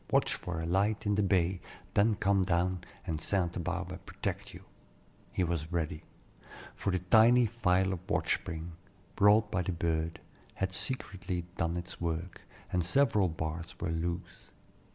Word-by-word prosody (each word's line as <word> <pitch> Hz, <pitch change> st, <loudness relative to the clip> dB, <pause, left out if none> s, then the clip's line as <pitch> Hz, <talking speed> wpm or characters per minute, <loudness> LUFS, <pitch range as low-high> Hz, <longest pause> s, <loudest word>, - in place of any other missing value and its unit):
Watch -, -, +3 dB
for 80 Hz, -2 st, -4 dB
a 80 Hz, -, -3 dB
light 100 Hz, +5 st, +1 dB
in 105 Hz, -, +2 dB
the 105 Hz, -, +2 dB
bay. 95 Hz, -2 st, +2 dB, 0.3 s
Then 105 Hz, +2 st, +4 dB
come 100 Hz, -1 st, +2 dB
down, 90 Hz, 0 st, +1 dB, 0.2 s
and 80 Hz, -4 st, -2 dB
St. 90 Hz, -3 st, 0 dB
Barbe -, -, -4 dB
protect -, -, -4 dB
you," -, -, -12 dB, 0.7 s
he 95 Hz, -, 0 dB
was 85 Hz, -2 st, -2 dB
ready; 80 Hz, -3 st, -1 dB, 0.7 s
for -, -, -2 dB
the 90 Hz, -, +2 dB
tiny 115 Hz, +7 st, +6 dB
file 95 Hz, -4 st, +2 dB
of 90 Hz, -, -4 dB
watch -, -, +2 dB
spring, 80 Hz, +1 st, -6 dB, 0.4 s
brought 105 Hz, +1 st, +5 dB
by 95 Hz, -4 st, +1 dB
the 90 Hz, -, -1 dB
bird, 80 Hz, -1 st, -1 dB, 0.4 s
had 95 Hz, 0 st, -1 dB
secretly 95 Hz, -6 st, -3 dB
done 85 Hz, +1 st, -1 dB
its 90 Hz, +1 st, -6 dB
work, 85 Hz, +1 st, -3 dB, 0.3 s
and 90 Hz, -1 st, +2 dB
several 105 Hz, -1 st, +3 dB
bars 80 Hz, +1 st, -4 dB
were -, -, -2 dB
loose. 85 Hz, +1 st, -4 dB
90 Hz, 155 wpm, -31 LUFS, 85-100 Hz, 0.7 s, tiny